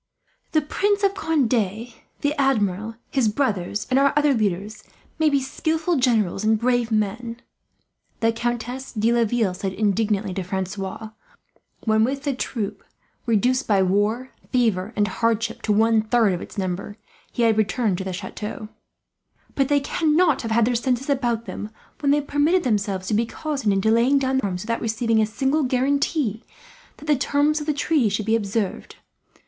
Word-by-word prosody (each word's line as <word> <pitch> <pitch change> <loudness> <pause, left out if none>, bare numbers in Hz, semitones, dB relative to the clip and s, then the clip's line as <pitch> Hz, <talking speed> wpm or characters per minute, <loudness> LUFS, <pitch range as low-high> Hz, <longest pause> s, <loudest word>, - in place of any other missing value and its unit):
"The 310 - +4
Prince 405 +7 0
of 395 0 +3
Conde, 315 - 0 0.7
the 290 0 +1
Admiral, 220 -6 0 0.2
his 265 -5 +2
brothers, 210 -4 -1
and 260 - +4
our 280 0 +3
other 295 -1 +4
leaders 210 -1 -2 0.4
may 315 -1 +4
be 280 -1 +2
skilful 320 +5 -1
generals 220 -7 +1
and 220 0 +3
brave 240 0 +1
men," 225 +3 -1 0.8
the 225 0 +2
Countess 240 +3 -3
de 225 +1 +2
Laville 230 -4 +1
said 190 +1 -4
indignantly 205 -1 0
to 190 - -3
Francois 190 +3 -4 0.7
when, 220 -1 +3
with 270 +4 -1
the 285 -2 0
troop, 210 -5 -4 0.4
reduced 245 +4 +2
by 200 -3 +3
war, 205 +7 0 0.2
fever, 220 -6 +1
and 205 -1 +2
hardship 230 +3 -1
to 215 - -1
one 220 +1 +4
third 220 -2 +2
of 175 - -4
its - - -10
number, 190 +2 -3 0.3
he 240 - -1
had 225 -1 +4
returned 215 -2 0
to - - -3
the 190 - -4
chateau, 210 +3 -6 0.8
"but 275 -2 +1
they 290 0 +3
cannot 315 +1 +2
have 225 - -4
had 225 0 +3
their 245 - +1
senses 250 +3 0
about 240 -4 0
them, 210 - -6 0.3
when 285 - 0
they 295 +1 +3
permitted 295 +6 +1
themselves 200 -6 -1
to 205 - -2
be 225 +2 +2
cozened 275 -4 -2
into 195 +3 +2
laying 240 +5 +4
down 265 -1 +1
their 200 - -1
arms, 180 -1 -4
without 230 +1 -2
receiving 225 0 +1
a 215 - +2
single 270 +7 0
guarantee 265 -2 0 0.5
that - - -12
the 300 -1 +3
terms 290 +3 +1
of 295 - -7
the - - +3
treaty 290 -4 +1
should 205 +1 -2
be 220 +1 +2
observed. 205 -2 -2
230 Hz, 170 wpm, -23 LUFS, 210-275 Hz, 0.8 s, The